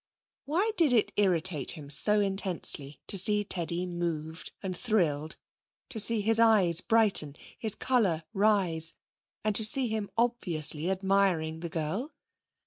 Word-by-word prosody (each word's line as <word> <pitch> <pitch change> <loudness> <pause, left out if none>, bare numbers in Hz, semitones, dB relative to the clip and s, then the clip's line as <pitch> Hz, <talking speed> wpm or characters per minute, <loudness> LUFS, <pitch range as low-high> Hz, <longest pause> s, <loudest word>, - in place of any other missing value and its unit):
Why 360 +10 0
did 310 -7 +3
it 225 -4 +2
irritate 180 -6 +1
him 145 -4 -10
so 210 +8 +4
intensely 185 -8 0
to 195 - +1
see 210 +2 +3
Teddy 175 -2 -3
moved 170 -2 -5
and 185 -1 -4
thrilled, 165 -9 -1 0.5
to 240 -4 -6
see 215 +1 0
his 225 +2 +1
eyes 195 -7 +4
brighten, 210 -11 +2 0.2
his 220 -2 +3
colour 200 -11 0
rise 190 -6 +1 0.5
and 215 -1 -1
to 220 - +2
see 245 +3 +3
him 215 -2 -4
obviously 175 -9 +1
admiring 190 -4 0
the 170 0 -6
girl? 165 - -4
195 Hz, 135 wpm, -28 LUFS, 165-220 Hz, 0.5 s, so